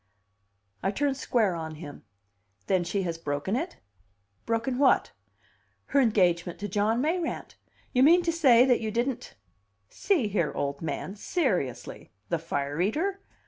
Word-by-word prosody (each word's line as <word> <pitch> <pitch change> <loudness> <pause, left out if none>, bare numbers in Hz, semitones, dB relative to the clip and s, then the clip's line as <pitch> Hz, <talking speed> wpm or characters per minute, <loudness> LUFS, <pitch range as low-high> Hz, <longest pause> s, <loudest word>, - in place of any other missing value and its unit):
I 190 - 0
turned 275 +6 0
square 230 -7 +1
on 160 -2 -5
him. 150 -5 -10 0.6
"Then 185 -2 +2
she 195 +3 -2
has 165 -2 -3
broken 145 +6 -2
it?" 330 +8 -3 0.7
"Broken 235 +3 -1
what?" 280 -2 +4 0.8
"Her 280 - +5
engagement 180 -7 +2
to 205 - -2
John 210 +4 +1
Mayrant. 330 +3 -2 0.4
You 250 - +3
mean 340 +6 +6
to 335 - +1
say 260 -7 +5
that 250 -3 +3
you 220 - -2
didn't 240 +3 -2 0.3
?" 100 0 -46
"See 335 - +1
here, 180 -7 0
old 140 0 -3
man. 170 +4 -4
Seriously. 195 - -2 0.2
The - - 0
fire 145 +3 -2
eater?" 355 - 0
215 Hz, 145 wpm, -27 LUFS, 170-270 Hz, 0.8 s, mean